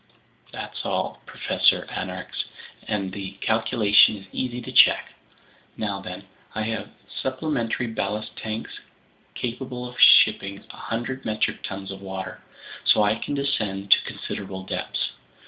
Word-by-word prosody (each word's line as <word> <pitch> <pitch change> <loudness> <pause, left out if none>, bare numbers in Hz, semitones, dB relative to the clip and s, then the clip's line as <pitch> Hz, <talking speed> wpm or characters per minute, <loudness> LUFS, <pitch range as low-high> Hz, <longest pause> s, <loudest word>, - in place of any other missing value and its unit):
"That's - - -6
all, - - -2
Professor - - +2
Aronnax, - - -4 0.4
and 100 -3 -1
the 100 -1 -5
calculation 110 0 +4
is 95 - -12
easy 125 -1 -2
to - - -7
check. - - +6 0.6
Now 100 -2 -2
then, 90 +1 -7 0.3
I 110 - 0
have 110 0 -3 0.3
supplementary 130 -3 -1
ballast 110 -2 -3
tanks 110 0 -5 0.6
capable 125 0 -4
of 125 - -10
shipping 95 0 +7 0.2
100 120 +3 -4
metric 110 -1 0
tons 95 0 -5
of 95 0 -8
water. 95 -1 -6 0.4
So 105 - +5
I 105 0 +4
can 115 +5 -3
descend 105 -8 -1
to - - +8
considerable 95 -1 -5
depths. 95 - -3
110 Hz, 130 wpm, -25 LUFS, 100-120 Hz, 0.6 s, to